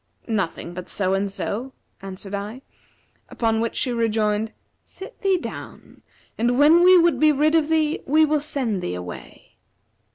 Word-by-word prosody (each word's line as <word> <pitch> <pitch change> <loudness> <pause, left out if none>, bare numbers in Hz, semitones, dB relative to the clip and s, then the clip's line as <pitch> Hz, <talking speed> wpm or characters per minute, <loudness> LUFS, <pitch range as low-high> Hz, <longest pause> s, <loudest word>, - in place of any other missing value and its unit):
'Nothing 190 -6 -3
but 180 0 -8
so 190 -1 0
and 195 +1 0
so,' 235 +6 -4 0.3
answered 195 +1 -8
I; 210 +6 -5 0.7
upon 225 -1 0
which 230 - -2
she 250 - 0
rejoined, 220 -2 0 0.3
'Sit 390 +6 -11
thee 390 -1 +2
down; - - -9 0.4
and 240 +2 +1
when 315 +5 +6
we 365 0 +8
would 335 -6 +3
be 310 +1 +5
rid 300 +2 +2
of 320 -2 +2
thee, 315 -1 +1
we 310 +3 +5
will 305 -1 0
send 255 -10 -2
thee 90 - -3
away.' 90 -1 -10
235 Hz, 160 wpm, -23 LUFS, 200-305 Hz, 0.7 s, we